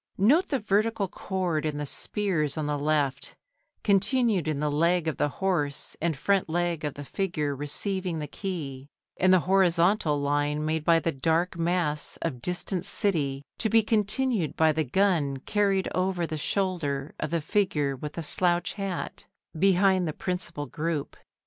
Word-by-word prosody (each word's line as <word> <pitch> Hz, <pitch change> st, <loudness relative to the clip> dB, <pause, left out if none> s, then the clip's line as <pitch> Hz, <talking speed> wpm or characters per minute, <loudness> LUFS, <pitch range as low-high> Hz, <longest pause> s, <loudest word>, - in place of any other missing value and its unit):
Note 285 Hz, -, +4 dB
the 275 Hz, -, 0 dB
vertical 210 Hz, -1 st, +1 dB
chord 180 Hz, -4 st, -2 dB
in 155 Hz, -2 st, -2 dB
the 145 Hz, -, -3 dB
spears 160 Hz, -2 st, -1 dB
on 155 Hz, -, -1 dB
the 145 Hz, -1 st, -1 dB
left, 145 Hz, -2 st, 0 dB, 0.5 s
continued 205 Hz, -, +2 dB
in 155 Hz, -2 st, -1 dB
the 150 Hz, 0 st, 0 dB
leg 170 Hz, +3 st, +2 dB
of 160 Hz, -, -1 dB
the -, -, +2 dB
horse 150 Hz, -5 st, -1 dB
and 165 Hz, -3 st, 0 dB
front 195 Hz, +3 st, +1 dB
leg 170 Hz, -1 st, -1 dB
of 150 Hz, -2 st, -3 dB
the 145 Hz, -, -7 dB
figure 150 Hz, -5 st, -2 dB
receiving 180 Hz, +5 st, -1 dB
the 150 Hz, -, -3 dB
key, 145 Hz, -6 st, -6 dB, 0.3 s
and 185 Hz, 0 st, +4 dB
the 185 Hz, -2 st, +5 dB
horizontal 175 Hz, -3 st, +3 dB
line 145 Hz, +1 st, 0 dB
made 155 Hz, 0 st, -1 dB
by 165 Hz, +1 st, +5 dB
the 165 Hz, 0 st, 0 dB
dark 165 Hz, +6 st, 0 dB
mass 170 Hz, -3 st, 0 dB
of 130 Hz, -8 st, -3 dB
distant 180 Hz, +2 st, 0 dB
city, 155 Hz, -9 st, 0 dB, 0.2 s
to 220 Hz, -, +1 dB
be 225 Hz, +1 st, +4 dB
continued 215 Hz, -, 0 dB
by 160 Hz, -1 st, +4 dB
the 155 Hz, +1 st, 0 dB
gun 155 Hz, -2 st, +1 dB
carried 195 Hz, +5 st, 0 dB
over 185 Hz, -1 st, 0 dB
the 160 Hz, -, -4 dB
shoulder 150 Hz, -5 st, -1 dB
of 155 Hz, -, -2 dB
the 170 Hz, -, 0 dB
figure 150 Hz, -5 st, 0 dB
with 150 Hz, +3 st, -7 dB
the 170 Hz, -, -5 dB
slouch 175 Hz, +3 st, +2 dB
hat 195 Hz, -3 st, -5 dB, 0.3 s
behind 190 Hz, -1 st, +4 dB
the 155 Hz, -, -2 dB
principal 180 Hz, -5 st, -3 dB
group. 155 Hz, -1 st, -3 dB
170 Hz, 165 wpm, -27 LUFS, 150-190 Hz, 0.5 s, the